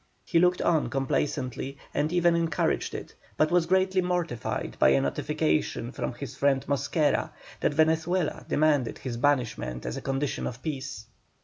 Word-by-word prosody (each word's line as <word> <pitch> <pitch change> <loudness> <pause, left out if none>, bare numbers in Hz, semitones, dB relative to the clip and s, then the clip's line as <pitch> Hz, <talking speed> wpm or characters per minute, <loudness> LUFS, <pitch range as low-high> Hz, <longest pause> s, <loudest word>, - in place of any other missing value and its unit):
He 170 - +3
looked 180 +1 +3
on 160 -3 +2
complacently, 135 0 -2 0.2
and 155 +2 0
even 175 -1 +3
encouraged 165 -2 0
it, - - -7 0.2
but 155 +1 +3
was 175 -1 +3
greatly 190 +1 +3
mortified 175 -9 -2
by 65 - +6
a 70 0 +4
notification 75 +2 -1
from - - -3
his - - -7
friend 135 -1 +2
Mosquera, 145 +1 +1 0.3
that 145 - 0
Venezuela 160 +2 +1
demanded 145 -5 +2
his 130 -3 -5
banishment 120 - 0
as - - -3
a - - -5
condition 135 +1 -2
of 125 +1 -7
peace. 140 -4 -5
150 Hz, 150 wpm, -27 LUFS, 130-170 Hz, 0.3 s, by